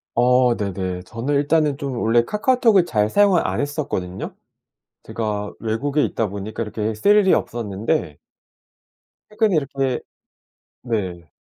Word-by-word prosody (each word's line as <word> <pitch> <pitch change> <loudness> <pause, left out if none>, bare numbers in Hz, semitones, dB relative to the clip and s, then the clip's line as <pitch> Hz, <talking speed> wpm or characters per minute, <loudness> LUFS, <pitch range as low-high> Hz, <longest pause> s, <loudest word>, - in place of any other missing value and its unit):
어. 125 0 +4
네네. 95 -3 -3
저는 115 +8 -3
일단은 145 0 +2
좀 135 -3 -4
원래 115 +1 +3
카카오톡을 210 - +3
잘 105 -5 +1
사용을 200 - +3
안 - - -2
했었거든요. 145 - -3 0.7
제가 105 -2 -3
외국에 135 +7 -1
있다 110 -3 -1
보니까 100 +3 -5
이렇게 105 0 -3
쓸 205 - +4
일이 195 -3 +5
없었는데 105 - -2 1.1
최근 215 -1 +1
이렇게 135 -4 0 0.8
네. 95 -9 -3
120 Hz, 275 characters per minute, -21 LUFS, 105-150 Hz, 1.1 s, 일이